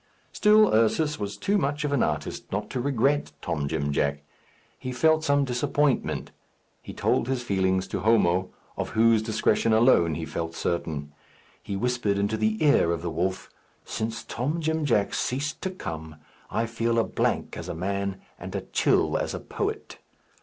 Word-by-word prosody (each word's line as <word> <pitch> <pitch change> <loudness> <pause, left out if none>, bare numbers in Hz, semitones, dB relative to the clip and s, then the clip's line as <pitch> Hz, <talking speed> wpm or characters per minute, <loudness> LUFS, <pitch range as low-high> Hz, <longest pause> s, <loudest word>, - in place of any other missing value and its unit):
Still 215 0 +5
Ursus 145 +8 +2
was 100 -1 -4
too 205 +1 +1
much 145 -1 -1
of 145 -1 -1
an 140 - +2
artist 75 -1 -2
not 105 +2 -3
to 125 - -2
regret 140 +2 +1
Tom 75 -5 -2
Jim 70 -1 -1
Jack. 70 +1 0 0.6
He 130 - -5
felt 155 +5 +3
some 145 -2 +3
disappointment. 130 +3 0 0.5
He - - -9
told - - 0
his 130 -2 -1
feeling 95 -4 +1
to 95 - -4
Homo, 95 -3 +3 0.3
of - - -2
whose 115 -1 +5
discretion 110 0 +1
alone 110 - +4
he 80 +1 -4
felt 85 0 -4
certain. 75 -4 -3 0.5
He 100 - -5
whispered 120 -2 0
into 100 +2 0
the 110 +5 0
ear 140 - +4
of 85 0 -2
the 85 - -2
wolf, 95 +4 -2 0.3
"Since 115 +1 -4
Tom 145 +8 -2
Jim 160 -1 0
Jack 105 -7 +2
ceased 140 +4 -2
to 190 - -1
come, 80 - -7 0.3
I 115 - 0
feel 115 0 -1
a 115 - +4
blank - - -1
as 85 - -6
a 90 - -4
man, 100 +2 -2 0.2
and - - -7
a - - -1
chill - - +1
as - - -2
a - - -4
poet." - - -4
110 Hz, 175 wpm, -26 LUFS, 90-135 Hz, 0.6 s, Still